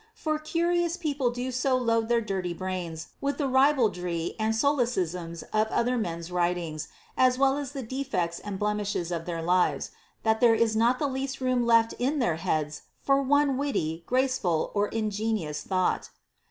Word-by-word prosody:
For 310 Hz, -5 st, -1 dB
curious 340 Hz, +2 st, 0 dB
people 290 Hz, -7 st, 0 dB
do 245 Hz, +2 st, -3 dB
so 255 Hz, +1 st, +1 dB
load 230 Hz, -2 st, +1 dB
their 235 Hz, -1 st, +3 dB
dirty 190 Hz, -5 st, -3 dB
brains 175 Hz, -3 st, -4 dB
with 280 Hz, 0 st, -1 dB
the 285 Hz, -, 0 dB
ribaldry 220 Hz, -, +2 dB
and 220 Hz, +1 st, +1 dB
solecisms 185 Hz, -, 0 dB
of 215 Hz, 0 st, +3 dB
other 240 Hz, +3 st, +1 dB
men's 170 Hz, -6 st, -3 dB
writings, 175 Hz, -3 st, -1 dB, 0.3 s
as 255 Hz, -1 st, +4 dB
well 270 Hz, 0 st, +3 dB
as 285 Hz, -2 st, -4 dB
the 270 Hz, -3 st, -4 dB
defects 220 Hz, -9 st, -2 dB
and 205 Hz, -2 st, -5 dB
blemishes 205 Hz, -4 st, -1 dB
of 165 Hz, -1 st, -3 dB
their 165 Hz, -2 st, -3 dB
lives, 180 Hz, +1 st, +1 dB, 0.3 s
that 220 Hz, 0 st, +2 dB
there 235 Hz, -2 st, +6 dB
is 225 Hz, -1 st, +2 dB
not 235 Hz, +3 st, +3 dB
the 295 Hz, -, -1 dB
least 270 Hz, 0 st, -3 dB
room 255 Hz, -2 st, +1 dB
left 230 Hz, -1 st, +4 dB
in 270 Hz, +5 st, +1 dB
their 235 Hz, -, +1 dB
heads 155 Hz, -4 st, -2 dB, 0.2 s
for 275 Hz, 0 st, +3 dB
one 280 Hz, 0 st, +3 dB
witty, 165 Hz, -, -1 dB
graceful, 255 Hz, -11 st, +1 dB
or 205 Hz, 0 st, +1 dB
ingenious 215 Hz, -8 st, -2 dB
thought. 185 Hz, -1 st, 0 dB
225 Hz, 165 wpm, -27 LUFS, 180-265 Hz, 0.3 s, there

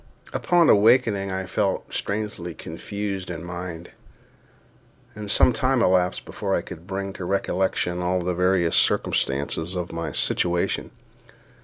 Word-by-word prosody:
Upon 175 Hz, -2 st, +3 dB
awakening 105 Hz, -2 st, +4 dB
I 95 Hz, 0 st, -3 dB
felt 95 Hz, +1 st, -1 dB
strangely 100 Hz, -5 st, -3 dB
confused 100 Hz, +3 st, -5 dB
in 85 Hz, -2 st, -5 dB
mind, 90 Hz, -1 st, -7 dB, 1.2 s
and 105 Hz, -1 st, -7 dB
some 125 Hz, -, +5 dB
time 130 Hz, +1 st, +2 dB
elapsed 90 Hz, -2 st, +2 dB
before -, -, -2 dB
I -, -, 0 dB
could 80 Hz, +3 st, -10 dB
bring 95 Hz, 0 st, -4 dB
to 95 Hz, -, -7 dB
recollection 90 Hz, -1 st, 0 dB
all 90 Hz, +1 st, +1 dB
the 90 Hz, +1 st, -1 dB
various 90 Hz, -1 st, +2 dB
circumstances 75 Hz, +6 st, +1 dB
of 90 Hz, -1 st, -3 dB
my 85 Hz, 0 st, -4 dB
situation. 85 Hz, 0 st, 0 dB
95 Hz, 130 wpm, -24 LUFS, 90-100 Hz, 1.2 s, some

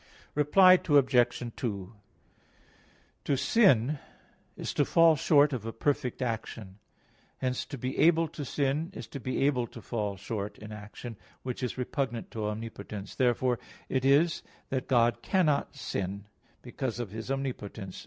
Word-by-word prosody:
Reply 185 Hz, +5 st, +6 dB
Obj. 125 Hz, -5 st, +3 dB
2: 100 Hz, -4 st, -4 dB, 1.3 s
To 140 Hz, -, +1 dB
sin 145 Hz, -, +4 dB, 0.6 s
is -, -, -4 dB
to -, -, +3 dB
fall 165 Hz, -1 st, +5 dB
short 145 Hz, 0 st, +4 dB
of 120 Hz, -5 st, -3 dB
a -, -, -2 dB
perfect 130 Hz, +1 st, -1 dB
action; 110 Hz, -4 st, -5 dB, 0.6 s
hence 130 Hz, -1 st, -2 dB
to 140 Hz, -, -6 dB
be 130 Hz, +2 st, -4 dB
able 165 Hz, 0 st, +5 dB
to 150 Hz, -1 st, -6 dB
sin 140 Hz, +4 st, -1 dB
is -, -, -6 dB
to 140 Hz, -, -6 dB
be 130 Hz, +1 st, -1 dB
able 125 Hz, -4 st, +1 dB
to -, -, -11 dB
fall 105 Hz, -4 st, -3 dB
short 100 Hz, +1 st, -5 dB
in 105 Hz, 0 st, -10 dB
action, 105 Hz, +2 st, -8 dB, 0.3 s
which 125 Hz, 0 st, -4 dB
is 125 Hz, 0 st, -3 dB
repugnant 125 Hz, -2 st, -3 dB
to 110 Hz, -2 st, -3 dB
omnipotence. 105 Hz, -2 st, -6 dB
Therefore 125 Hz, -1 st, +1 dB, 0.3 s
it 130 Hz, -1 st, 0 dB
is 145 Hz, +5 st, +4 dB, 0.3 s
that 130 Hz, -1 st, -2 dB
God 120 Hz, -3 st, +3 dB
cannot 155 Hz, -8 st, +1 dB
sin, 100 Hz, -6 st, -4 dB, 0.4 s
because 125 Hz, -1 st, -4 dB
of 115 Hz, -6 st, -4 dB
His 110 Hz, +3 st, -6 dB
omnipotence. 115 Hz, -8 st, -4 dB
125 Hz, 145 wpm, -29 LUFS, 110-140 Hz, 1.3 s, Reply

